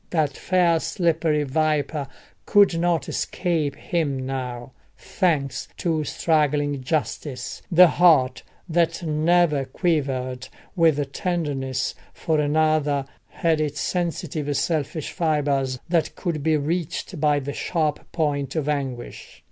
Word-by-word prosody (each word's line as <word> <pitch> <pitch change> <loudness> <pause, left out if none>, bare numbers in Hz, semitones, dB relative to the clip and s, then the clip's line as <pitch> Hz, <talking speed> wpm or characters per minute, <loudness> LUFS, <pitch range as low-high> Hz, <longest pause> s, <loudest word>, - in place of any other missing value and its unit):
That 150 -5 0
fair 175 -3 +2
slippery 160 -4 +1
viper 150 0 0 0.4
could 200 -5 +5
not 170 -1 +1
escape 160 -6 -1
him 140 -6 -2
now; 125 -2 -5 0.3
thanks 155 -8 -1
to 160 -3 0
struggling 145 -4 +1
justice, 130 -2 -3
the 180 +1 +8
heart 155 -7 +4 0.3
that 170 +1 +1
never 155 -1 +2
quivered 130 -4 -1 0.3
with 150 -5 +2
tenderness 140 -7 -2 0.2
for 160 -2 0
another 150 -2 +2 0.2
had 160 -2 0
its 145 -1 -2
sensitive 160 -5 -2
selfish 155 -1 -1
fibres 145 -6 0
that 165 -2 0
could 170 -5 -3
be 155 +1 +2
reached 165 +3 -3
by 150 -1 +3
the 140 +1 -5
sharp 155 -2 -2
point 145 -4 -1
of 155 -3 -1
anguish. 135 -5 -4
150 Hz, 115 wpm, -23 LUFS, 140-165 Hz, 0.4 s, the